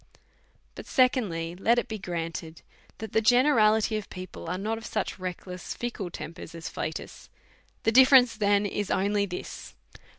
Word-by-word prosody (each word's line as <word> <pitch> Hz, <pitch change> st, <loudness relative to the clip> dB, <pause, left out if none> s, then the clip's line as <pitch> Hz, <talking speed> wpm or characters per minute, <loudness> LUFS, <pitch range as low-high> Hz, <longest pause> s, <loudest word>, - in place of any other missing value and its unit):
But, -, -, -10 dB
secondly, 200 Hz, -, +1 dB
let 225 Hz, +6 st, +2 dB
it 240 Hz, -, 0 dB
be 220 Hz, -1 st, -5 dB
granted 165 Hz, -2 st, -5 dB, 0.3 s
that 220 Hz, -2 st, -7 dB
the 220 Hz, -, +2 dB
generality 220 Hz, -3 st, +4 dB
of 210 Hz, -, -7 dB
people 185 Hz, 0 st, -8 dB
are 180 Hz, -, -2 dB
not 220 Hz, +3 st, -2 dB
of 225 Hz, -, -11 dB
such -, -, -3 dB
restless, 180 Hz, 0 st, -6 dB
fickle 235 Hz, -6 st, -4 dB
tempers 165 Hz, 0 st, -8 dB
as 165 Hz, 0 st, -6 dB
Flatus; -, -, -6 dB, 0.5 s
the 225 Hz, -, +3 dB
difterence 255 Hz, -1 st, +7 dB
then 205 Hz, -1 st, +2 dB
is 205 Hz, 0 st, -2 dB
only 200 Hz, +1 st, +1 dB
this. 180 Hz, -1 st, -7 dB
205 Hz, 155 wpm, -27 LUFS, 180-225 Hz, 0.5 s, difterence